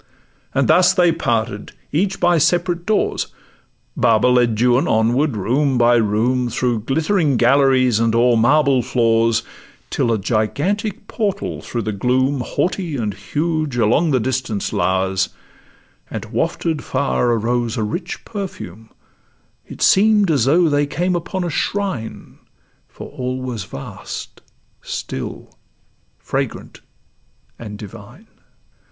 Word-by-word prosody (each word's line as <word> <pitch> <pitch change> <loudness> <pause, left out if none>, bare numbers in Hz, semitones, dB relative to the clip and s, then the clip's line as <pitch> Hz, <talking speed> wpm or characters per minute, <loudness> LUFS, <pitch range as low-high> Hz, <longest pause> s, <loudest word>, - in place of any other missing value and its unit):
And - - +2
thus 180 +1 +5
they 175 -3 +4
parted, 115 -7 -2 0.2
each 190 +6 0
by 175 -1 +3
separate 175 +2 +1
doors; 215 -1 0 0.7
Baba 110 - +3
led 120 -3 +2
Juan 125 +2 +3
onward 120 +4 +1
room 130 +6 +1
by 120 0 +4
room 120 +3 +1
Through 120 0 0
glittering 155 - +1
galleries 130 -2 +3
and 115 0 +1
o'er 120 +1 +4
marble 135 +3 +3
floors, 115 -1 +2 0.5
Till 115 - 0
a 115 - +2
gigantic 175 - -1
portal 210 -4 -3
through 120 -2 -4
the 110 - -2
gloom, 130 +6 0
Haughty 175 -1 -2
and 105 -4 -2
huge, 150 - -2
along 120 +9 +2
the 130 -3 +2
distance 120 -3 -2
lowers; 95 +1 0 0.8
And - - -5
wafted 160 -3 -2
far 130 -2 0
arose 115 +1 -1
a 110 - 0
rich 110 - -5
perfume: 110 - -7 0.8
It - - -5
seem'd 205 -2 +4
as 135 -7 +2
though 165 +5 +4
they 145 -1 +1
came 180 +5 -1
upon 180 +2 -3
a 175 - -2
shrine, 190 - -3 0.5
For - - -10
all 130 0 -4
was 120 -6 -5
vast, 70 - -8 0.4
still, - - -6 0.6
fragrant, - - -4 0.8
and 105 -3 -8
divine. 105 -2 -12
125 Hz, 125 wpm, -19 LUFS, 115-165 Hz, 0.8 s, thus